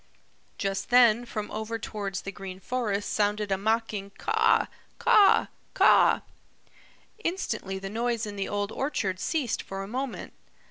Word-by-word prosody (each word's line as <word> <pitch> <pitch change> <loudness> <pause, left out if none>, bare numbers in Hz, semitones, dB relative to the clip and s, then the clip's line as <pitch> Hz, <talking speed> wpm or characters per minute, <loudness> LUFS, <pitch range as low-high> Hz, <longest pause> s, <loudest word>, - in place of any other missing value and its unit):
Just 195 0 -2
then 240 -1 +5
from 215 -3 -5
over 220 +1 -3
towards 200 -3 -5
the 195 - -5
Green 190 -2 -8
Forest 210 -3 -2
sounded 210 0 0
a - - +4
mocking 220 -1 -1
"Caw, 450 +1 +3 0.3
caw, 405 -2 +5 0.3
caw!" - - +5 1.0
Instantly 220 - -2
the 195 0 -6
noise 230 +2 -1
in 205 -1 -6
the 195 -1 -3
Old 205 0 -2
Orchard 205 -9 -2
ceased 290 - -1
for 195 0 -6
a - - -7
moment. 255 +4 -4
215 Hz, 140 wpm, -27 LUFS, 195-240 Hz, 1.0 s, then